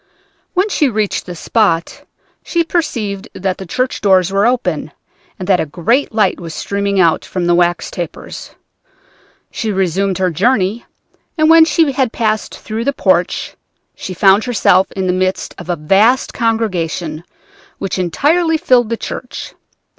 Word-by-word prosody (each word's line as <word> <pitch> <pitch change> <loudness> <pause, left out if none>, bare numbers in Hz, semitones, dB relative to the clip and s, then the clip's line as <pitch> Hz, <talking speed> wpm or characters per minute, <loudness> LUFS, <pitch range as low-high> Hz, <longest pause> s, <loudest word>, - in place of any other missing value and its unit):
When 370 +3 +2
she 300 -8 +2
reached 215 -5 -2
this 175 -2 -7
spot 195 -8 0 0.4
she 340 -1 0
perceived 230 - -2
that 185 0 -2
the 190 - -7
church 255 +8 -2
doors 190 -3 +3
were 200 +3 +2
open, 180 - -1 0.4
and 185 - -6
that 190 -3 +3
a - - 0
great 230 - 0
light 215 -4 +1
was 165 -3 -7
streaming 200 -1 -1
out 170 -3 +3
from 180 -2 -3
the 175 - +3
wax 175 0 +1
tapers. 175 -2 -7 1.0
She 220 -2 -2
resumed 190 0 0
her 185 -1 +1
journey, 210 - +1 0.5
and 310 0 +4
when 325 0 +8
she 320 -2 +2
had 260 -3 0
passed 220 -3 -1
through 225 +2 -5
the 280 - +1
porch - - 0 0.4
she 185 - -7
found 195 +3 +4
herself 195 -6 +2
in 190 -1 -2
the 180 - +1
midst 185 +1 -1
of 175 -1 -10
a 175 - +1
vast 195 +11 +2
congregation 180 -8 -2 0.5
which 195 -1 -3
entirely 315 - +1
filled 250 -8 +3
the 230 - -1
church. - - -7
200 Hz, 155 wpm, -16 LUFS, 180-240 Hz, 1.0 s, when